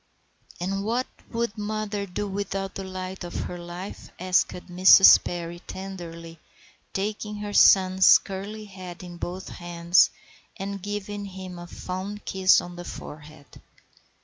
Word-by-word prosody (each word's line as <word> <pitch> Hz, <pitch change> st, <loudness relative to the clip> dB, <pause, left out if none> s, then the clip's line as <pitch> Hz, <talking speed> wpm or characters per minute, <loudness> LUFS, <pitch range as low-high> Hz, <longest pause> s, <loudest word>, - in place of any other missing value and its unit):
"And 195 Hz, +3 st, -2 dB
what 235 Hz, +4 st, 0 dB, 0.2 s
would 230 Hz, -2 st, -2 dB
mother 210 Hz, -1 st, -3 dB
do 205 Hz, +3 st, -3 dB
without 195 Hz, -1 st, -3 dB
the 195 Hz, -, -5 dB
light 185 Hz, 0 st, -6 dB
of 175 Hz, -, -7 dB
her 175 Hz, -, -5 dB
life?" 175 Hz, +3 st, -8 dB
asked 185 Hz, +1 st, +3 dB
Mrs. 185 Hz, +2 st, +7 dB
Perry 175 Hz, 0 st, -5 dB
tenderly, 170 Hz, -4 st, -8 dB, 0.5 s
taking 210 Hz, +1 st, -3 dB
her 205 Hz, 0 st, -5 dB
son's 190 Hz, -1 st, +7 dB
curly 205 Hz, +2 st, -7 dB
head 185 Hz, -3 st, -10 dB
in 175 Hz, -1 st, -9 dB
both 180 Hz, +2 st, -5 dB
her -, -, -9 dB
hands 175 Hz, 0 st, +3 dB, 0.5 s
and 195 Hz, 0 st, -5 dB
giving 205 Hz, +1 st, -4 dB
him 185 Hz, -2 st, -8 dB
a 175 Hz, -, -9 dB
fond 190 Hz, +4 st, -6 dB
kiss 190 Hz, -1 st, +4 dB
on 175 Hz, 0 st, -9 dB
the 175 Hz, -, -6 dB
forehead. 150 Hz, -3 st, -11 dB
190 Hz, 140 wpm, -26 LUFS, 175-200 Hz, 0.5 s, Mrs